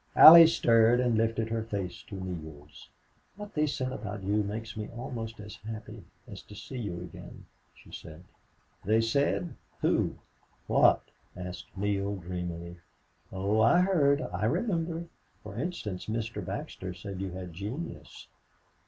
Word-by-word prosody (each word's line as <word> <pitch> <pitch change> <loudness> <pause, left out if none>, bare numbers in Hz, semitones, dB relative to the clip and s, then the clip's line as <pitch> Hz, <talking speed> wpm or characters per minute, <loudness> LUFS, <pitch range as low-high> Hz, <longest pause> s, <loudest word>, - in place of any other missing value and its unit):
Allie 165 +1 +12
stirred 115 -6 +4
and 125 -2 +2
lifted 115 0 +1
her 115 0 -1
face 100 -5 -4
to 100 - -8
Neale's. 80 -6 -8 0.5
"What 205 +1 -9
they 150 0 +2
said 130 -2 -2
about 105 -4 -6
you 100 +2 +1
makes 105 +1 -5
me 105 -1 -5
almost 115 -3 -6
as 105 0 -9
happy 110 -2 -8 0.2
as - - -9
to 105 - -14
see 130 +5 -7
you 90 -6 -4
again," 90 - -10 0.3
she - - -17
said. 80 +2 -10 0.6
"They 110 +3 +3
said! 140 +8 +1 0.3
Who? - - +1 0.5
What?" - - +4 0.3
asked 90 +1 -8
Neale, 100 0 0
dreamily. 85 -1 -6 0.5
"Oh, 100 +3 +1
I 120 +11 +6
heard, 155 -6 +3
I 90 +5 -1
remember!... 170 - -1 0.4
For 105 -1 -9
instance, 120 - -4
Mr. 110 -2 -3
Baxter 95 - -5
said 95 +1 -7
you 95 -2 -4
had 90 -2 -7
genius." 105 - -7
105 Hz, 145 wpm, -29 LUFS, 95-125 Hz, 0.6 s, Allie